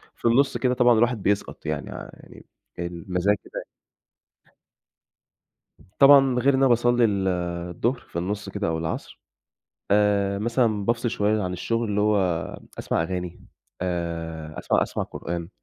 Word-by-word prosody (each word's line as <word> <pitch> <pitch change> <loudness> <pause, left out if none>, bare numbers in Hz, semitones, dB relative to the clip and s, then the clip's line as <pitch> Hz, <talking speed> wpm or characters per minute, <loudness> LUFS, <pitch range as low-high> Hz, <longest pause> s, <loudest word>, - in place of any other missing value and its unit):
في - - -13
النُص 135 +4 +3
كدا 125 -1 +1
طبعًا 120 -2 +4
الواحد 120 -2 +1
بيسقَط، 100 +1 -1
يعني - - -3
ع - - -8
يعني - - -15 0.3
المزاج 90 +3 -1
كده - - -8 2.3
طبعًا 135 -2 +7
غير 140 +3 +3
إن 130 - +2
أنا 135 - +5
باصلّي 120 0 +3
ال 100 -3 0 0.4
الضُهر 120 +9 -1
في 85 - -6
النُص 105 +3 -3
كدا 100 0 -3
أو 80 - 0
العصر، 80 0 -5 0.7
آآ 100 -1 +2
مثلًا 115 -2 +1
بافصِل 115 +2 0
شوية 105 0 +1
عن 90 -1 -2
الشُغل 115 +6 -2
اللي 105 0 0
هو 105 0 +3 0.6
أسمع - - 0
أغاني، 90 0 -5 0.4
آآ 85 -3 -4
أسمع - - +1
أسمع - - -3
قرآن. 85 -1 -5
105 Hz, 140 wpm, -24 LUFS, 90-120 Hz, 2.3 s, طبعًا